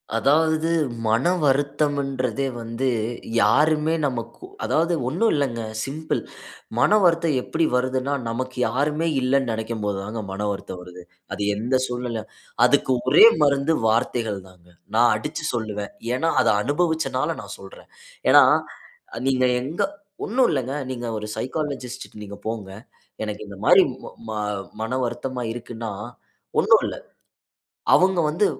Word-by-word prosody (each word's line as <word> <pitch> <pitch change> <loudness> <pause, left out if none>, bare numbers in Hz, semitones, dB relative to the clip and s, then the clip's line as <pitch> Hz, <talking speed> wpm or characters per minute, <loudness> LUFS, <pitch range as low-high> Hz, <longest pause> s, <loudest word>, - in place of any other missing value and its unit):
அதாவது, 160 +6 +2 0.4
மனவருத்தம்ன்றதே 140 -1 +1
வந்து, 115 +3 -3 0.5
யாருமே 150 +7 +3
நமக்கு 125 - -6 0.2
அதாவது 165 +2 +1
ஒண்ணும் 180 - +2
இல்லங்க, 130 -5 -1 0.2
சிம்பிள். 155 +3 -3 0.6
மன - - +4
வருத்தம் 165 -4 +3
எப்படி 160 +5 0
வருதுன்னா, 130 +2 0
நமக்கு 130 +3 -4
யாருமே 150 +4 0
இல்லன்னு 130 -1 +1
நினைக்கும் 110 0 -4
போது 100 -1 -1
தாங்க 110 +2 -5
மன 105 +2 -3
வருத்தம் 95 -2 -6
வருது. 90 0 -11 0.3
அது - - -5
எந்த 120 +5 +1
சூழ்நிலை 120 -2 -3 0.4
அதுக்கு - - +3 0.2
ஒரே 150 - +9 0.2
மருந்து, 140 +2 +3
வார்த்தைகள் 115 -2 0
தாங்க. 90 -1 -20 0.3
நான் 120 +1 +5
அடிச்சு 150 +7 -4
சொல்லுவேன். 105 -3 -3 0.2
ஏன்னா, 165 +5 +1
அத 120 - +1 0.2
அனுபவிச்சனால 160 +4 0
நான் - - -8
சொல்றேன். - - -13 0.4
ஏன்னா, - - +9 0.9
நீங்க 130 -1 +2 0.2
எங்க 155 +10 -2 0.4
ஒண்ணும் 250 +4 +3
இல்லங்க, 130 -2 -1 0.2
நீங்க 120 -1 -5
ஒரு 105 0 -6
சைக்காலஜிஸ்ட்ட 130 -5 -4
நீங்க 100 0 -9
போங்க. 105 -4 -4 0.5
எனக்கு 105 0 -5
இந்த 100 - -10
மாரி, - - +8 0.2
ம - - -8 0.2
ம - - -3 0.5
மன 115 +2 -3
வருத்தமா 120 +1 -3
இருக்குன்னா, 115 -2 -6 0.7
ஒன்னும் - - +5
இல்ல. - - -4 1.0
அவுங்க 185 -1 +5
வந்து 175 +7 +2
130 Hz, 125 wpm, -23 LUFS, 115-150 Hz, 1.0 s, ஒரே